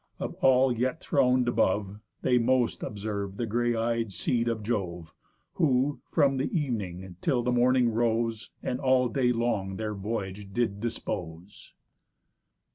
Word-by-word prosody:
Of -, -, -4 dB
all 130 Hz, -1 st, +5 dB
yet 130 Hz, +6 st, -1 dB
thron'd 125 Hz, -4 st, +2 dB
above, 100 Hz, -3 st, +1 dB, 0.2 s
They 125 Hz, -1 st, +4 dB
most 125 Hz, 0 st, +1 dB
observ'd 100 Hz, -1 st, -4 dB
the 120 Hz, -, -1 dB
grey 120 Hz, +2 st, 0 dB
eyed 115 Hz, -1 st, -1 dB
seed 115 Hz, +5 st, 0 dB
of 115 Hz, -2 st, -1 dB
Jove; 90 Hz, -7 st, -3 dB, 0.5 s
Who, 140 Hz, -1 st, +2 dB
from 135 Hz, -1 st, +3 dB
the 130 Hz, -, -1 dB
evening 95 Hz, -, -4 dB
till 125 Hz, -3 st, +1 dB
the 125 Hz, -, +1 dB
morning 125 Hz, 0 st, +4 dB
rose, 115 Hz, -1 st, 0 dB
And 125 Hz, -, -2 dB
all 130 Hz, -2 st, +3 dB
day 125 Hz, 0 st, +2 dB
long 115 Hz, -5 st, -1 dB
their 110 Hz, -1 st, -3 dB
voyage 100 Hz, -1 st, -5 dB
did 110 Hz, -4 st, 0 dB
dispose. 90 Hz, -5 st, -6 dB
115 Hz, 140 wpm, -28 LUFS, 100-125 Hz, 0.5 s, all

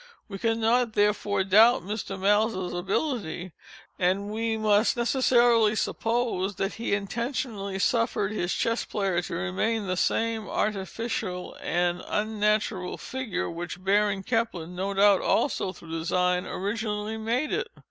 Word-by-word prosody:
We 195 Hz, -2 st, -7 dB
cannot, 230 Hz, +1 st, +2 dB
therefore, 205 Hz, -1 st, +1 dB
doubt 215 Hz, +5 st, +5 dB
Mr. 195 Hz, 0 st, -4 dB
Maelzel's 205 Hz, -1 st, +1 dB
ability, 185 Hz, -, -2 dB, 0.5 s
and 190 Hz, +3 st, +1 dB
we 225 Hz, +1 st, -1 dB
must 215 Hz, +2 st, +3 dB
necessarily 235 Hz, -3 st, +4 dB
suppose 225 Hz, -4 st, -1 dB
that 195 Hz, +1 st, -2 dB
he 225 Hz, -3 st, -1 dB
intentionally 205 Hz, -1 st, -3 dB
suffered 220 Hz, -1 st, +1 dB
his 180 Hz, -4 st, -2 dB
Chess 230 Hz, +1 st, 0 dB
Player 195 Hz, -4 st, -1 dB
to -, -, -5 dB
remain 205 Hz, -, -1 dB
the 185 Hz, -1 st, -1 dB
same 225 Hz, +2 st, 0 dB
artificial 200 Hz, -2 st, -3 dB
and 175 Hz, 0 st, 0 dB
unnatural 210 Hz, -3 st, 0 dB
figure 260 Hz, -8 st, -4 dB
which 175 Hz, +2 st, -6 dB
Baron 200 Hz, 0 st, +2 dB
Kempelen 225 Hz, -8 st, -1 dB
(no 195 Hz, +2 st, -3 dB
doubt 200 Hz, 0 st, +5 dB
also 195 Hz, -8 st, +1 dB
through 170 Hz, -3 st, -13 dB
design) 180 Hz, +2 st, 0 dB
originally 210 Hz, +2 st, -3 dB
made 240 Hz, +7 st, -1 dB
it. 470 Hz, +3 st, -1 dB
210 Hz, 125 wpm, -27 LUFS, 185-225 Hz, 0.5 s, doubt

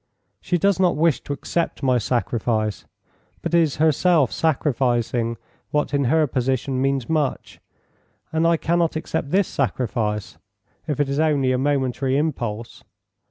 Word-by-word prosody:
"She 180 Hz, -, 0 dB
does 195 Hz, +2 st, +2 dB
not 180 Hz, -2 st, +3 dB
wish 160 Hz, -4 st, +2 dB
to -, -, -7 dB
accept 165 Hz, +3 st, -3 dB
my 130 Hz, -2 st, +3 dB
sacrifice, 110 Hz, -2 st, -1 dB, 0.6 s
but -, -, -3 dB
is 165 Hz, -4 st, +3 dB
herself 155 Hz, -1 st, +3 dB
sacrificing 120 Hz, -6 st, 0 dB, 0.3 s
what 150 Hz, 0 st, -1 dB
in 140 Hz, -1 st, +2 dB
her 155 Hz, +5 st, +3 dB
position 130 Hz, 0 st, -1 dB
means 135 Hz, -2 st, 0 dB
much, 155 Hz, -4 st, -2 dB, 0.7 s
and 160 Hz, +1 st, +2 dB
I 170 Hz, 0 st, +3 dB
cannot 170 Hz, 0 st, 0 dB
accept 155 Hz, -2 st, -3 dB
this 190 Hz, +3 st, +2 dB
sacrifice, 110 Hz, -6 st, -2 dB, 0.5 s
if 150 Hz, -1 st, -2 dB
it 145 Hz, -, +2 dB
is 140 Hz, +2 st, -2 dB
only 145 Hz, -5 st, +2 dB
a 125 Hz, -, +1 dB
momentary 135 Hz, -1 st, 0 dB
impulse. 120 Hz, -7 st, -3 dB
140 Hz, 140 wpm, -22 LUFS, 125-160 Hz, 0.7 s, not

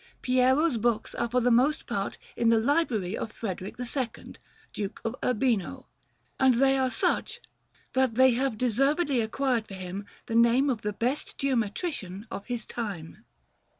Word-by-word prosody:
Piero's 255 Hz, +3 st, +3 dB
books 225 Hz, -1 st, 0 dB
are 235 Hz, -, -2 dB
for 250 Hz, +2 st, +2 dB
the 245 Hz, +1 st, +3 dB
most 275 Hz, +7 st, +3 dB
part -, -, -3 dB, 0.2 s
in 230 Hz, -, +2 dB
the 230 Hz, -, +5 dB
library 225 Hz, -, +1 dB
of 225 Hz, -, -4 dB
Frederick 190 Hz, -4 st, -5 dB
II, 250 Hz, -1 st, -3 dB, 0.4 s
Duke 205 Hz, 0 st, -4 dB
of 225 Hz, +2 st, -1 dB
Urbino, 235 Hz, -5 st, 0 dB, 0.5 s
and 265 Hz, -2 st, +5 dB
they 270 Hz, +2 st, +4 dB
are 260 Hz, -1 st, +1 dB
such -, -, 0 dB, 0.5 s
that 260 Hz, -3 st, +2 dB
they 260 Hz, +1 st, +6 dB
have 250 Hz, -1 st, 0 dB
deservedly 275 Hz, +4 st, +2 dB
acquired 235 Hz, 0 st, 0 dB
for 195 Hz, -, -8 dB
him 190 Hz, +2 st, -6 dB, 0.2 s
the -, -, -5 dB
name 235 Hz, +4 st, +4 dB
of 230 Hz, -4 st, -3 dB
the 210 Hz, 0 st, -2 dB
best 250 Hz, +8 st, -2 dB
geometrician 230 Hz, -, -2 dB
of 200 Hz, -, -6 dB
his 240 Hz, -3 st, -3 dB
time. 195 Hz, -9 st, -6 dB
240 Hz, 155 wpm, -28 LUFS, 215-265 Hz, 0.5 s, they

